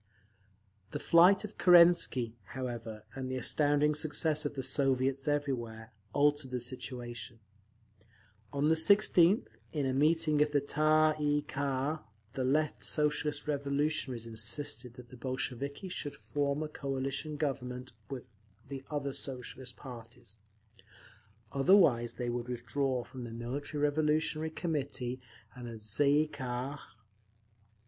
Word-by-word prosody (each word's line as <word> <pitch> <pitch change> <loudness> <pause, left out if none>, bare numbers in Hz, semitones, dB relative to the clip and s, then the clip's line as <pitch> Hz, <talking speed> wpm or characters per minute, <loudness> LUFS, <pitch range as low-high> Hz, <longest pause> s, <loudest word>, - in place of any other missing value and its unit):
The - - -2
flight 180 +4 +6
of 210 0 -8
Kerensky, 170 -9 +6 0.2
however, 115 -4 -5
and 130 -1 -5
the 130 - -2
astounding 145 +3 +2
success 155 0 0
of 145 - -3
the 135 - -3
Soviets 135 0 +1
everywhere, 120 -6 -2 0.2
altered 145 0 +2
the 125 -1 -2
situation. 120 -2 -6 1.1
On 145 +2 +1
the - - +5
16th, 190 +2 +4
in 145 -3 -1
a 130 - 0
meeting 155 +1 +3
of 150 0 +2
the 145 - +4
Tsay 155 +2 +3
ee 145 0 +2
kah, 140 +1 -2 0.3
the 135 -2 -2
Left 150 +4 +1
Socialist 150 0 0
Revolutionaries 140 -3 -1
insisted 115 +2 -1
that 125 -1 -12
the 130 - -12
Bolsheviki 135 +6 -4
should 150 -5 -4
form 145 +1 -1
a - - -3
coalition 140 +1 -3
Government 130 -3 -3 0.2
with 130 -3 -6 0.4
the 135 -1 -6
other 140 -2 -2
Socialist 125 -2 -5
parties; 120 -4 -11 1.1
otherwise 135 - +4
they 120 -1 -2
would 120 0 -4
withdraw 125 +1 -1
from 130 0 -9
the 120 - -7
Military 135 +6 -4
Revolutionary 155 +1 +1
Committee 140 -6 -3 0.3
and 125 -2 -8
the 115 - -6
_Tsay 110 +6 0 0.2
ee - - -5
kah. 130 0 -4
140 Hz, 125 wpm, -32 LUFS, 125-150 Hz, 1.1 s, flight